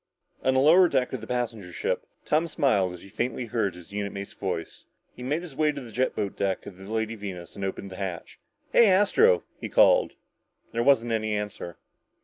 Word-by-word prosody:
On 130 0 +2
the - - +4
lower 170 +6 +6
deck 125 -3 0
of 130 - -3
the 110 - -8
passenger 115 -7 -3
ship, - - -2 0.2
Tom 160 +3 +2
smiled 120 - +2
as 90 - -11
he - - -12
faintly 120 +4 -2
heard 110 -5 -1
his 90 +2 -13
unit 100 -1 -3
mate's 100 0 -7
voice. 90 -4 -5 0.3
He - - -11
made 145 +7 -1
his 160 -6 -10
way 155 +1 +2
to 145 - -6
the 120 -4 -10
jet 130 +4 0
boat 100 - -2
deck 95 -1 -1
of 95 -3 -10
the 95 - -11
Lady 110 0 -1
Venus 95 -5 -7
and 100 - -6
opened 95 0 -4
the 95 - -8
hatch. 95 -4 -6 0.3
"Hey, 235 - +7
Astro," 205 - +4 0.2
he - - -5
called. - - +5 0.6
There 115 - -1
wasn't 120 -2 +3
any 110 -1 0
answer. 105 -4 -5
115 Hz, 210 wpm, -26 LUFS, 100-140 Hz, 0.6 s, Hey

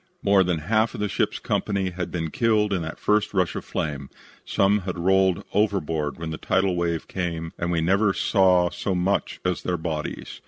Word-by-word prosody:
More 100 -1 +5
than 90 -3 -1
half 110 +3 +2
the 105 - -2
ship's - - -1
company 95 -3 -1
had 90 0 -4
been 80 -3 -3
killed 110 -3 +2
in 90 - 0
that 80 0 -5
first 105 -1 +1
rush 90 -3 +1
of - - -4
flame. 70 -3 -4 0.3
Some 100 +2 +2
had 90 -2 -5
rolled 95 0 +2
overboard 80 -8 0
when 80 -1 -5
the 80 - -5
tidal 95 -1 +1
wave 85 -2 -1
came 85 -3 -4
and 85 0 -1
we 85 -1 +1
never 100 +5 +3
saw 90 -3 +3
so 95 - -2
much 95 +3 0
as 90 -1 0
their 90 -1 -1
bodies. 80 -2 -5
90 Hz, 190 wpm, -24 LUFS, 85-100 Hz, 0.3 s, More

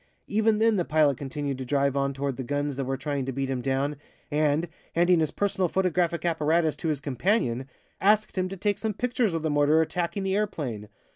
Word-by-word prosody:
Even 215 +1 +2
then 220 -1 +3
the 180 - +2
pilot 150 -4 +2
continued 140 -1 -4
to - - -3
drive 140 +1 +1
on 140 0 +1
toward 140 -1 -3
the 130 - -5
guns 145 +2 -2
that 135 0 -2
were 135 +1 -2
trying 140 +1 -2
to - - -1
beat 135 +1 -2
him 130 -2 -2
down, 135 +2 -1 0.3
and, 150 +2 +2 0.3
handing 175 +1 +4
his 155 -2 +2
personal 190 -1 0
photographic 175 -3 0
apparatus 160 -1 +2
to 165 - -4
his 150 -3 0
companion, 135 - 0 0.3
asked 210 +2 +3
him 185 -1 0
to 195 - -6
take 205 +2 0
some 220 -2 -2
pictures 245 -6 0
of 160 - -2
the 160 - 0
mortar 145 +2 +4
attacking 175 +4 -1
the 190 0 0
airplane. 135 - -3
155 Hz, 210 wpm, -27 LUFS, 140-185 Hz, 0.3 s, handing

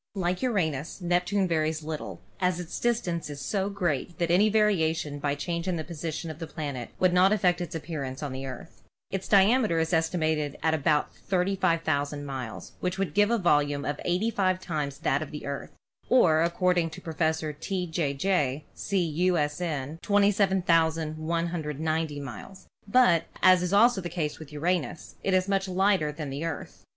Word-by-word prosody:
Like 180 -1 -1
Uranus, 165 - -1
Neptune 180 +2 +1
varies 160 -2 0
little, 155 0 -6 0.2
as 180 -1 +1
its 175 -2 -5
distance 180 -10 -1
is 145 -1 -7
so 195 +8 -1
great 175 -5 -2
that 170 -1 0
any 200 +5 +5
variation 165 -9 +1
by 145 0 0
change 170 +4 -3
in 185 - 0
the 160 - -3
position 165 0 -5
of 155 - -11
the 165 - -5
planet 140 -7 -5
would 185 -1 +3
not 185 +2 +5
affect 180 -4 +2
its 175 0 -5
appearance 150 -4 -5
on 145 - -3
the 135 +1 -5
Earth. 130 +5 -9 0.3
Its 195 -1 -3
diameter 205 -1 +4
is 160 +2 0
estimated 160 -3 0
at 160 - +3
about 150 -1 +1
35,000 165 -6 0
miles, 125 -9 -6
which 180 +1 -2
would 195 -1 -2
give 205 +1 +4
a 235 - +2
volume 145 -6 +2 0.2
85 185 0 +1
times 150 -6 -3
that 140 - +1
of 155 - -5
the 150 - -7
Earth 140 0 -5 0.4
(or 165 -11 +5
ac 170 +1 +1
cording 180 -2 +2
to - - -9
Professor 160 -1 -1
T. 185 +5 -3
J. 160 -4 -1
J. 145 -4 0
See, 190 -3 -1
U. 175 +3 +1
S. 150 +2 -1
N., 155 -2 -3
27,190 165 -5 +1
miles); 140 - -9 0.2
but, 200 -7 +4 0.2
as 185 -1 +5
also 210 0 +5
the 175 - -5
case 155 -3 -3
with 155 -2 -10
Uranus, 165 +2 -2
it 190 - +1
is 185 +1 +2
much 195 -1 0
lighter 185 -4 +2
than 150 -2 -6
the 140 +4 -4
Earth. 165 -3 -6
165 Hz, 170 wpm, -27 LUFS, 150-185 Hz, 0.4 s, any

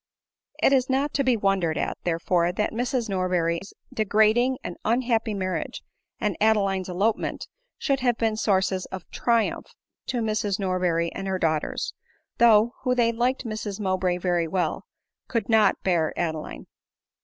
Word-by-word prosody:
It - - +5
is 260 -1 +2
not 270 +2 0
to 275 - +1
be 255 -3 +3
wondered 195 -6 +1
at, - - -1
therefore, 170 0 +1
that 210 +4 -1
Mrs 245 +1 -1
Mow 185 -2 -1
bray's 170 +1 -1 0.2
degrading 220 +4 +3
and 175 - -5
unhappy 230 -2 +1
marriage, 185 -2 -3 0.4
and 210 -4 -1
Adeline's 195 -4 +2
elopement, 200 +5 -1 0.3
should 275 -3 0
have 245 -2 +1
been 225 -1 0
sources 190 -3 +1
of 190 -3 -8
triumph 235 -2 0 0.3
to 245 -2 -1
Mrs 215 -2 0
Norberry 180 -3 0
and 195 - -5
her 190 -1 0
daughters; 160 -3 -1 0.5
who, - - +3
though 225 +1 +6 0.2
they 235 -2 +3
liked 245 +3 -1
Mrs 215 -2 -4
Mowbray 185 -2 0
very 175 -2 0
well, 180 +2 -2 0.4
could 230 -4 -1
not 220 -2 +4
bear 170 -4 +1
Adeline. 160 -3 -3
205 Hz, 150 wpm, -25 LUFS, 185-230 Hz, 0.5 s, though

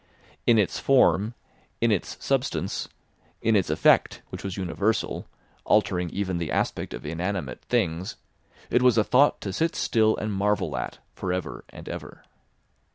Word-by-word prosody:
In 115 - +6
its 105 -4 +1
form, 120 -4 +3 0.4
in 115 -1 +3
its 100 - -1
substance, - - -1 0.5
in 110 0 +2
its 95 -4 +2
effect, - - +3
which - - -7
was 95 0 -4
universal, 95 +4 -1 0.4
altering 90 -4 +2
even 95 -1 -2
the 85 -3 -3
aspect - - -1
of - - -9
inanimate 85 -3 -3
things, 85 +4 0 0.6
it 125 - +4
was 125 -2 +5
a 110 - +5
thought 135 +6 +4
to 95 - -4
sit 165 - 0
still 110 -2 +2
and 105 0 -2
marvel 100 +2 0
at - - -4 0.2
for 90 - -3
ever 90 -10 -4
and - - -11
ever. - - -8
100 Hz, 155 wpm, -26 LUFS, 90-110 Hz, 0.6 s, In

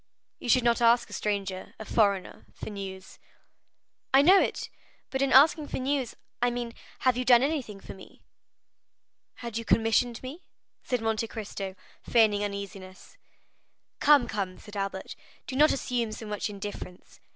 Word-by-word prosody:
"You - - -6
should 255 0 +5
not 235 0 +2
ask 235 -1 +4
a - - -8
stranger, 195 -2 -3
a 220 - -8
foreigner, 200 -4 0
for - - -7
news." 190 -2 -8 0.9
"I 270 +1 +6
know 375 +5 +7
it, - - -2 0.4
but 265 - -1
in 275 -1 +2
asking 295 +2 +6
for - - -4
news, 265 -1 -1 0.3
I 245 - +3
mean, 240 -1 -4 0.3
have 255 -2 +3
you 250 - 0
done 245 0 +6
anything 270 -9 -2
for - - -10
me?" 190 - -15 1.2
"Had 230 -1 -3
you - - -5
commissioned 230 +2 +2
me?" 280 +8 -7 0.4
said 250 -3 -2
Monte 225 0 0
Cristo, 200 -4 -6 0.3
feigning 215 -3 +3
uneasiness. 200 -2 -7 0.8
"Come, 290 -4 +5
come," 195 -3 -3
said 210 -1 -13
Albert, 195 -1 -4 0.3
"do 260 - -6
not 300 +3 +5
assume 240 -4 -1
so 220 - -7
much 210 0 -3
indifference. 200 -3 -8
225 Hz, 155 wpm, -28 LUFS, 200-255 Hz, 1.2 s, know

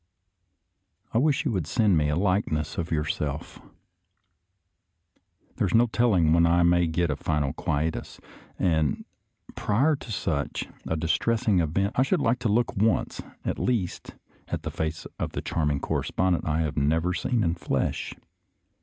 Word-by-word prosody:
I 115 - +3
wish 150 +3 +2
you 135 - +1
would 90 -8 -1
send 105 0 +3
me 75 -2 +2
a 75 - +1
likeness 90 -5 0
of 85 0 -3
your 75 -2 0
self. 75 -2 -4 2.0
There 100 - +1
is 90 - 0
no 115 +2 +6
telling 105 -9 +3
when 85 0 +5
I 85 +1 +4
may 85 0 +4
get 80 0 0
a - - -1
final 75 -4 -1
quietus, 80 -1 -2 0.4
and 80 -5 +1 0.5
prior 135 +10 +2
to 125 - -9
such 100 - -2 0.2
a 80 - 0
distressing 95 +5 +1
event 95 +6 0
I - - +6
should 130 - +2
like 115 +2 +1
to 120 -3 0
look 115 +3 +1
once, 110 +3 +1 0.2
at - - -2
least, 110 -8 -2 0.3
at - - -4
the - - -4
face 80 0 -3
of - - -3
the - - -3
charming 75 -4 0
correspondent 90 +4 0
I 80 +1 +1
have 80 -2 -2
never 80 +5 +2
seen 115 +4 0
in 85 -2 +1
the 85 - -10
flesh. - - -2
85 Hz, 165 wpm, -26 LUFS, 80-110 Hz, 2.0 s, no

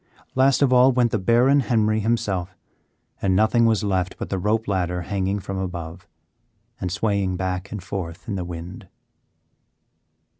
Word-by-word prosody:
Last 135 +1 +3
of 130 -2 +3
all 125 +1 +6
went 120 -2 +2
the 110 - 0
Baron 120 +8 +4
Henry 110 -4 +1
himself, 100 -5 -1 0.6
and 95 -2 +2
nothing 110 +3 +4
was 110 -2 +1
left 95 -2 -1
but - - -6
the 95 - -1
rope 110 +4 0
ladder 90 -3 -1
hanging 100 +1 -1
from 95 -1 -5
above, 85 -3 -6 0.7
and 90 - -3
swaying 100 -2 0
back 95 +1 -3
and 105 -4 -6
forth 95 -1 -6
in 110 - -3
the 95 -2 -2
wind. 85 +1 -8
100 Hz, 155 wpm, -23 LUFS, 90-115 Hz, 0.7 s, all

